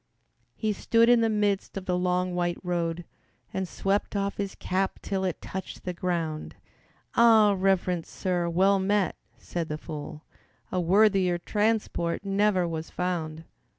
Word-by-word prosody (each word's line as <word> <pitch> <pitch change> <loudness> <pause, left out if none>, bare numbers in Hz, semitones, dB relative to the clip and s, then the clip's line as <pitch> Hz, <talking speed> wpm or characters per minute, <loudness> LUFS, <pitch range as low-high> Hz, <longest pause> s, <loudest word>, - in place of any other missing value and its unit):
He 215 - -1
stood 230 +3 +3
in 240 -1 +6
the 225 - +3
midst 205 -2 0
of 190 - -5
the 180 - 0
long, 180 0 0
white 175 -1 0
road 170 -1 -2 0.5
And 190 -1 -2
swept 195 +4 -1
off 200 0 -1
his 200 -2 -3
cap 190 +1 -1
till 195 -1 -2
it 185 -3 -3
touched 190 0 -6
the 180 - -3
ground. 170 -4 -3 0.6
"Ah, 220 -3 +6
Reverent 185 -3 +1
Sir, 175 -2 -1
well 190 +3 +3
met," 200 0 +1 0.2
said 170 -2 -4
the 150 - -2
fool, 155 0 -8 0.5
"A 185 - 0
worthier 190 0 +4
transport 205 -2 -1
never 195 -2 +2
was 160 -1 -4
found. 165 -3 -3
185 Hz, 150 wpm, -27 LUFS, 175-200 Hz, 0.6 s, in